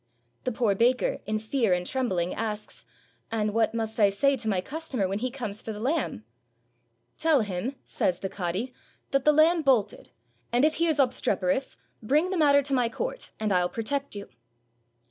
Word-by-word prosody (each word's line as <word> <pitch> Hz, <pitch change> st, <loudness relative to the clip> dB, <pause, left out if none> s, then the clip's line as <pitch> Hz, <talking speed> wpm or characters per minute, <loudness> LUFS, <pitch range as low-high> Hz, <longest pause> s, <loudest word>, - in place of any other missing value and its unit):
The 255 Hz, -, 0 dB
poor 230 Hz, -3 st, +1 dB
baker, 245 Hz, +5 st, +2 dB
in 215 Hz, 0 st, 0 dB
fear 220 Hz, -2 st, +1 dB
and 180 Hz, 0 st, -3 dB
trembling 185 Hz, -8 st, -1 dB
asks, 215 Hz, -1 st, -5 dB, 0.5 s
"And 215 Hz, -2 st, 0 dB
what 225 Hz, 0 st, +1 dB
must 220 Hz, 0 st, -3 dB
I 205 Hz, -2 st, +6 dB
say 275 Hz, +8 st, +2 dB
to 230 Hz, -2 st, -4 dB
my 195 Hz, -3 st, +1 dB
customer 270 Hz, -, -3 dB
when 195 Hz, +2 st, -2 dB
he 255 Hz, +3 st, -1 dB
comes 230 Hz, -6 st, -4 dB
for 225 Hz, -, -5 dB
the 210 Hz, -, -7 dB
lamb?" 260 Hz, -, -1 dB, 1.0 s
"Tell 320 Hz, -5 st, +4 dB
him," 205 Hz, +6 st, -3 dB
says 180 Hz, -, 0 dB
the 195 Hz, -, -4 dB
cadi, 190 Hz, +7 st, -3 dB, 0.4 s
"that 275 Hz, -2 st, +1 dB
the 300 Hz, -, +7 dB
lamb 320 Hz, +3 st, +4 dB
bolted; 245 Hz, -8 st, +1 dB, 0.4 s
and 245 Hz, +4 st, +4 dB
if 310 Hz, -, +1 dB
he 335 Hz, +1 st, +2 dB
is 315 Hz, -2 st, +1 dB
obstreperous, 250 Hz, -3 st, +1 dB, 0.2 s
bring 300 Hz, -, +2 dB
the 375 Hz, -, -1 dB
matter 285 Hz, -3 st, +5 dB
to 275 Hz, 0 st, -1 dB
my 245 Hz, -3 st, +2 dB
court, -, -, -4 dB
and 215 Hz, -1 st, -1 dB
I'll 180 Hz, -1 st, +2 dB
protect 275 Hz, +3 st, -2 dB
you." 200 Hz, 0 st, -7 dB
230 Hz, 185 wpm, -27 LUFS, 205-280 Hz, 1.0 s, the